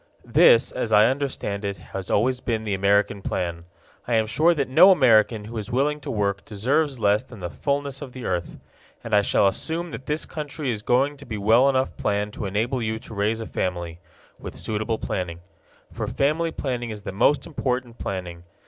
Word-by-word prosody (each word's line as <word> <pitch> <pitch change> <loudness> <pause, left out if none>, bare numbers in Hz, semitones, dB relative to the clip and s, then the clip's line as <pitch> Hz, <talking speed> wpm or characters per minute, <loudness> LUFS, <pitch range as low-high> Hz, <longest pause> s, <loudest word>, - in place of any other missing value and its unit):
This, - - +5
as - - -3
I 105 +1 +7
understand 130 -6 -2
it, 100 -1 -3 0.2
has 95 -1 -5
always 125 +5 +2
been 115 -3 -2
the 105 -2 -2
American 100 +1 +2
plan. 85 -3 -3 0.4
I 120 - +1
am 110 -1 +3
sure 160 +10 +3
that 140 -4 0
no 165 +9 +7
American 115 - +4
who 115 +1 -5
is 110 +3 -6
willing 145 +4 +1
to - - -8
work 100 -2 -1
deserves 130 +6 0
less 105 0 +3
than 125 -4 -13
the 85 -2 -5
fullness 140 - -2
of 140 -3 -7
the 125 -1 -8
earth. 90 -2 -3 0.5
And - - -6
I 105 - +6
shall 100 - +3
assume 165 - -2
that 130 - -8
this 150 +1 -1
country 150 -3 -4
is 110 -3 -4
going 135 +6 +1
to 140 - -12
be 110 -3 -4
well 115 +6 +4
enough 130 -1 0
planned 105 0 -1
to 105 - -4
enable 115 +6 -1
you 110 0 -2
to 115 - -11
raise 105 +2 0
a - - -4
family 85 -4 -3 0.4
with - - -8
suitable 110 +1 -2
planning. 85 -5 -4 0.5
For - - -4
family 155 +4 0
planning 125 -6 -3
is 105 -2 -7
the - - -5
most 125 +9 +2
important 125 -6 -3
planning. 90 -3 -5
115 Hz, 200 wpm, -24 LUFS, 100-135 Hz, 0.5 s, I